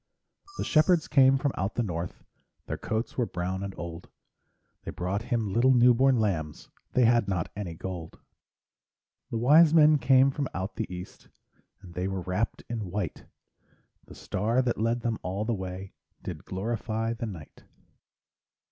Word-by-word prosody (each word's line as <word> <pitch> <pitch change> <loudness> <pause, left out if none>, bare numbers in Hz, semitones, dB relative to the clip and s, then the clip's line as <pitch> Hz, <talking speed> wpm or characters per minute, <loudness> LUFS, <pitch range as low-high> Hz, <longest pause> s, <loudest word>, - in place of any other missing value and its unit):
The - - -2
shepherds 155 +1 +3
came 135 -2 +5
from 140 0 0
out 95 +3 -2
the 120 - +1
north, 85 -3 -5 0.4
Their - - -5
coats 110 +3 -3
were 120 - +1
brown 90 +2 -3
and 100 -1 -5
old, 85 0 -7 0.7
They - - -6
brought 95 +4 -2
Him 115 -4 -2
little 130 +3 +4
new 125 0 +6
born 130 +1 +3
lambs 80 -8 -2 0.2
They 125 - +4
had 115 -2 +3
not 90 -4 -2
any 95 -5 -5
gold. 85 -1 -7 1.1
The 115 - -2
wise 150 +7 +6
men 155 -1 +6
came 130 +2 +5
from 140 0 -2
out 95 +3 -4
the 110 -4 -4
east, 90 0 -9 0.5
And 90 -2 -12
they 90 +2 -2
were 95 -1 -3
wrapped 95 +5 -2
in 110 -5 -4
white; 90 -4 -4 0.8
The - - -13
star 115 +7 0
that 120 -3 -1
led 115 +2 +1
them 115 -1 -2
all 95 +4 -3
the 120 - 0
way 95 -1 -6 0.3
Did - - -7
glorify 110 +3 -2
the 115 0 -5
night. 85 -8 -10
110 Hz, 165 wpm, -28 LUFS, 95-125 Hz, 1.1 s, new